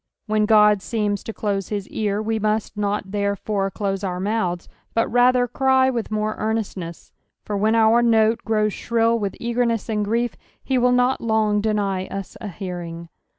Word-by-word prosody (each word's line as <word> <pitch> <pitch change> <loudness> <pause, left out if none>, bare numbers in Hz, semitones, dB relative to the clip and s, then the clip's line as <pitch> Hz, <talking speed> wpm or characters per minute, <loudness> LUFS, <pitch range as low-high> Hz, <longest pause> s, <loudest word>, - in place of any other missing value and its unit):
When 215 -1 +1
Ood 210 -2 +6
seems 205 -2 -2
to - - -4
close 200 -3 -2
his 205 -2 -3
ear, 210 -1 -1
we 220 0 -1
must 215 +1 -1
not 205 -1 -2
therefore 200 -1 -1
close 195 -1 -3
our 180 -2 -2
mouths, 185 -3 -1 0.3
but 230 - +2
rather 245 +1 +4
cry 265 +1 +3
with 235 -3 -3
more 215 0 -1
earnestness; 205 -6 -4 0.3
for 210 - -3
when 215 +3 +2
our 225 +1 +5
note 225 -1 +3
grows 215 -2 +1
shrill 230 0 +1
with 200 -2 -3
eagerness 235 -1 -1
and 210 -1 0
grief, 235 +3 0 0.3
he 260 -2 +1
will 250 +1 +3
not 250 +1 +2
lone 220 -2 +1
deny 200 -3 -1
us 195 -1 -6
a 215 - -5
hearing. 175 -3 -6
215 Hz, 170 wpm, -22 LUFS, 200-230 Hz, 0.3 s, Ood